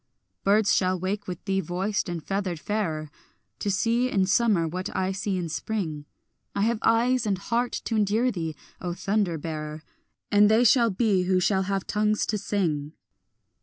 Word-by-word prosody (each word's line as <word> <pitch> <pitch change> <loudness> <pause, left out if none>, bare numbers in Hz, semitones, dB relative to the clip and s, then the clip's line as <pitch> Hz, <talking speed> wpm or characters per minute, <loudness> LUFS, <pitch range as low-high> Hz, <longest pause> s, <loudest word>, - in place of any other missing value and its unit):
Birds 205 +1 +4
shall 185 -1 +2
wake 200 +3 -3
with 180 -2 -6
thee 195 -1 +1
voiced 190 +3 -2
and 170 -2 -4
feathered 190 -3 -2
fairer, 160 -7 -2 0.5
To 205 - -2
see 230 +5 +1
in 195 -5 +2
summer 200 -4 +3
what 180 +3 -4
I 190 0 0
see 195 0 -2
in 175 -2 -2
spring; 160 -4 -3 0.5
I 200 - +1
have 230 0 +1
eyes 235 +1 +2
and 195 -2 +1
heart 235 +5 -1
to 225 - -1
endure 215 +4 +2
thee, 165 -5 -4 0.3
O 175 -1 -3
thunder 195 -4 0
bearer, 155 0 -5 0.5
And 205 0 +6
they 220 +3 +5
shall 235 -1 +5
be 195 -3 +1
who 185 0 +3
shall 190 +1 +2
have 195 -1 -1
tongues 210 0 +1
to 210 - -1
sing. 160 -8 -1
195 Hz, 170 wpm, -26 LUFS, 175-215 Hz, 0.5 s, And